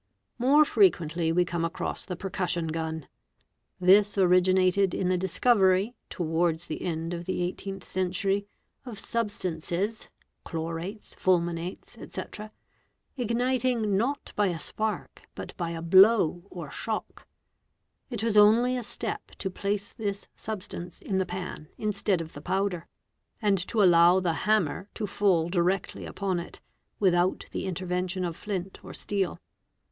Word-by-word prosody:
| - - -49
More 300 +2 +7
frequently 170 - +2
we 175 +2 +3
come 170 -1 -2
across 165 +1 -3
the 180 - -4
percussion 175 -2 -2
gun. 160 -1 -3 0.7
'This 200 +3 +5
originated 185 +1 +4
_ - - -3
in 185 - +1
the 185 - +3
discovery, 190 +2 +3 0.2
towards 165 0 0
the 155 - -5
end 165 0 -3
of 170 0 -5
the 185 - -2
18th 190 +2 -4
century, 195 +2 0 0.4
of 240 -5 -8
substances 200 -2 -2 0.3
(chlorates, 165 +5 -5
fulminates, 175 +4 -1
etc.) 215 0 -6 0.6
igniting 245 -3 +1
not 250 +8 -1
by 205 -1 +3
a 175 -3 -1
spark 215 +6 -3
but - - -7
by 170 -2 -3
a 165 0 -5
blow 190 -1 +6
or 170 -6 -8
shock. 220 +7 -5 0.8
It 235 -4 -3
was 225 -2 +1
only 225 +5 +6
a 250 - -3
step - - -4
to 190 - -3
place 200 +2 -2
this 200 -2 -4
substance 185 -5 -6
in 190 -1 -1
the 190 - 0
pan 180 -4 -6
instead 200 -4 0
of 165 0 -8
the 145 - -9
powder, 185 0 -1 0.5
and 205 -3 +2
to 220 -3 +2
allow 175 0 +6
the 175 -3 0
hammer 200 0 0
to 215 - -2
fall 185 -5 +2
directly 180 +2 0
upon 190 -3 -2
it, 170 - -8 0.4
without 180 -2 +2
the - - -3
_ - - -4
intervention 185 0 -2
of 170 -2 -3
flint 190 -2 -5
or - - -8
steel. 195 -3 -1
185 Hz, 145 wpm, -28 LUFS, 175-205 Hz, 0.8 s, More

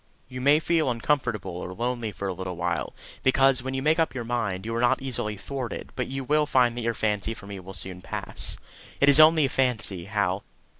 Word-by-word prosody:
You 125 0 -7
may 145 +3 +5
feel 160 -2 +1
uncomfortable 120 -7 -1
or 90 +1 -6
lonely 120 -1 -2
for 100 0 -5
a 95 - -2
little 90 0 -5
while, 85 -2 -2 0.3
because, 135 -1 +4
when 130 +1 -4
you 135 - -2
make 155 +3 +3
up 160 -4 +1
your 125 - -3
mind, 110 -5 -2
you 115 - -3
are 115 - 0
not 120 - +3
easily 115 -5 -4
thwarted; 130 +3 -5
but 125 - -2
you 135 +1 -4
will 150 +3 +2
find 125 -4 +3
that 120 - -3
your 115 0 -1
fancy 105 +1 -1
for 100 - -12
me 100 -1 -7
will 95 +1 -10
soon 90 -1 -5
pass. - - -3 0.4
It 140 - +5
is 145 +1 +8
only 155 -1 +7
a - - -1
fancy, 110 -9 0
Hal. 100 -2 -1
120 Hz, 220 wpm, -26 LUFS, 100-135 Hz, 0.4 s, is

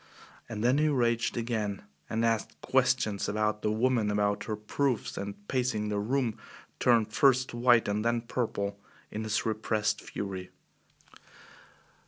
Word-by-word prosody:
And 110 -1 -4
then 125 +4 +4
he 155 - +3
raged 120 -5 +1
again 110 -4 -2 0.3
and 115 +1 0
asked 115 -2 -1
questions 100 -2 +1
about 105 0 0
the 105 - +1
woman, 115 -1 +2
about 105 0 0
her 110 - -2
proofs, 115 +3 -1
and 100 0 -6
pacing 125 -5 0
the 105 -1 0
room, 120 +1 0 0.4
turned 115 -3 +3
first 130 0 +3
white 120 -1 +4
and 105 +1 0
then 115 0 +1
purple 100 -4 -2 0.3
in 110 - -4
his 110 -1 -1
repressed 110 -1 0
fury. 95 -2 -5
110 Hz, 140 wpm, -29 LUFS, 105-120 Hz, 0.4 s, then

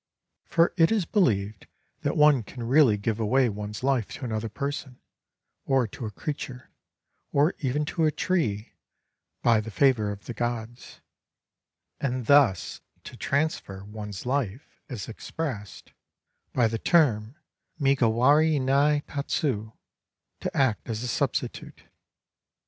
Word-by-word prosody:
(For 165 0 +2
it 165 +1 +5
is 215 -6 +1
beUeved 105 - 0 0.3
that - - -1
one 150 -4 +6
can 120 +3 -9
really 125 -3 +4
give 105 +2 -2
away 125 +3 +3
one's 105 +2 -6
life 130 -5 +1
to 135 - -6
another 110 -1 -3
person, 140 +1 -5 0.6
or 135 -2 +2
to 115 - -6
a - - -4
creature, 130 +2 -6 0.6
or 145 +5 +3
even 145 +2 -1
to 160 +2 0
a 155 - +3
tree, 140 - -1 0.7
by 115 -2 +4
the 110 - -7
favor 110 -3 +2
of 100 0 -9
the 120 - -5
gods; 120 0 -5 0.5
— - - -38
and 130 -3 -2
thus 135 -9 +3 0.2
to - - -10
transfer 140 -10 -2
one's 105 -2 -7
Hfe 125 -3 -1 0.3
is 120 -7 -6
expressed 115 -2 -6 0.6
by 120 -3 +3
the 115 0 -3
term 125 -8 +2 0.4
migawari 140 +3 +3
ni 140 +3 +3
tatsu, 135 -7 -2 0.7
"to - - -4
act 130 -4 +1
as 110 +1 -3
a - - -2
substitute.") - - -3
125 Hz, 130 wpm, -26 LUFS, 110-145 Hz, 0.7 s, one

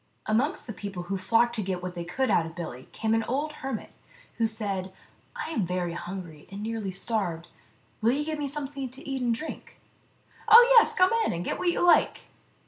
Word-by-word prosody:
Amongst 240 +8 0
the 225 - -6
people 195 -2 -6
who 195 +2 -3
flocked 230 +5 +3
to - - 0
get 185 -2 -3
what 180 0 -4
they 175 -1 -5
could 255 +10 -1
out 165 - +3
of 165 - -11
Billy 130 -8 -7
came 220 0 -1
an 225 - +3
old 290 +6 -1
hermit, 270 0 -4 0.5
who 225 - +3
said, 200 -4 -3 0.2
" - - -35
I - - -5
am 225 -10 0
very 180 -1 -2
hungry, 170 -4 -7
and 200 +1 -6
nearly 220 -3 -3
starved. 185 -4 -2 0.5
Will 230 +3 +4
you 295 +2 -1
give 310 -1 -3
me 290 - -1
something 275 -1 -4
to 260 +3 -12
eat 270 -1 -2
and 240 -1 +1
drink 310 +7 -8 0.3
?" - - -37
" - - -26
Oh, 470 +2 +10
yes; - - +1
come 370 0 +5
in - - 0
and 170 +1 -4
get - - -2
what 360 - +2
you 345 - +1
like." 350 - +4
220 Hz, 220 wpm, -27 LUFS, 180-270 Hz, 0.5 s, Oh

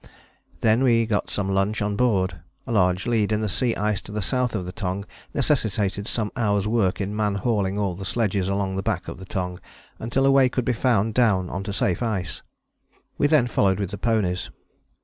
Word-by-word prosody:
Then 110 +2 +3
we 115 -3 +4
got 110 -2 -1
some 100 -1 -2
lunch 100 +3 +1
on 105 0 -1
board. 100 -6 +1 0.2
A - - -5
large 90 -3 +2
lead 110 -3 +1
in 105 0 +1
the 110 - 0
sea 115 +4 +1
ice 105 -2 0
to - - -11
the 105 - -3
south 125 +2 0
of 95 -4 -2
the 90 - -5
Tongue 100 0 -3 0.3
necessitated 105 -8 0
some 110 -3 -2
hours' 105 -5 +1
work 105 -4 +1
in 100 +1 -3
man 105 -2 0
hauling 100 -2 0
all 95 -2 -2
sledges 100 -2 0
along 100 -1 -1
the - - 0
back - - -2
of - - -7
the 95 - -9
Tongue 90 -3 -4 0.4
until 125 +4 0
a 135 - +5
way 135 -2 +5
could 125 -1 -2
be 125 - +2
found 110 -3 +1
down 105 -7 +2
on 95 - -3
to 100 - -3
safe 95 -1 0
ice. 100 -7 -2 0.8
We 145 - +4
then 145 -5 +4
followed 100 -5 +2
with 100 -2 -3
the 100 - -6
ponies. 105 -6 0
105 Hz, 205 wpm, -24 LUFS, 95-115 Hz, 0.8 s, a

